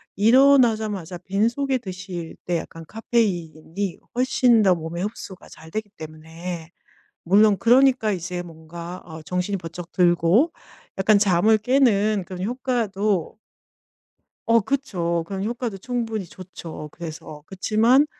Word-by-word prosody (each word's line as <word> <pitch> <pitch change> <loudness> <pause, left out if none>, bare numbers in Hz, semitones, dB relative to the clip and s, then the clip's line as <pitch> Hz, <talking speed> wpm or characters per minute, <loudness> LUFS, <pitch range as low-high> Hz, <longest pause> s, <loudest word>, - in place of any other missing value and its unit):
일어나자마자 220 - +3
빈속에 235 +9 0
드실 185 -4 -7
때 175 -1 0
약간 165 0 -8
카페인이 190 -5 -2 0.2
훨씬 250 -2 +3
더 185 -2 +5
몸에 170 +1 -5
흡수가 195 -2 -7
잘 160 +1 -14
되기 215 -1 -4
때문에 160 +2 -8 0.6
물론 205 +3 +5
그러니까 250 -2 +4
이제 175 0 -4
뭔가 170 +2 -9
어 160 -1 -9
정신이 180 +5 -2
번쩍 175 0 -8
들고 180 - +3 0.5
약간 205 +2 +4
잠을 205 +2 +4
깨는 215 -5 +2
그런 185 -1 -7
효과도 215 -6 -1 1.1
어 230 0 +5
그쵸. 185 -9 -1
그런 195 0 -4
효과도 235 -2 -3
충분히 225 -2 -3
좋죠. 170 -3 -9
그래서 155 -2 -9
그치만 225 +9 +3
195 Hz, 265 characters per minute, -23 LUFS, 170-225 Hz, 1.1 s, 더